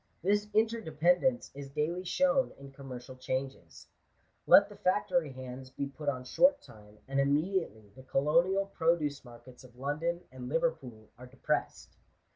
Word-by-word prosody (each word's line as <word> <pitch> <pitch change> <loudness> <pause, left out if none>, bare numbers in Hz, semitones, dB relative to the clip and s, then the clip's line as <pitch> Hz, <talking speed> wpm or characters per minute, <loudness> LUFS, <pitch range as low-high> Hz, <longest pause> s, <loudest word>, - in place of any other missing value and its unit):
This 205 +2 +2
interdependence 220 - +2
is 140 0 -8
daily 155 +6 -2
shown 270 +7 +2
in 140 0 -12
commercial 130 -2 -9
changes. 130 +1 -5 0.6
Let 200 - +8
the 205 - -13
factory 180 -5 +1
hands 130 0 -8
be 135 +2 -4
put 145 +1 -4
on 130 -2 -3
short 275 - +4
time, 105 - -16
and 135 +1 -1
immediately 140 - 0
the - - -12
colonial 170 +9 +2
produoe 165 -5 +1
markets 120 0 -14
of 125 -2 -16
London 155 +6 -2
and 125 -1 -8
Liverpool 140 -9 -2
are 125 - -10
depressed. 130 +1 -3
145 Hz, 140 wpm, -31 LUFS, 130-180 Hz, 0.6 s, Let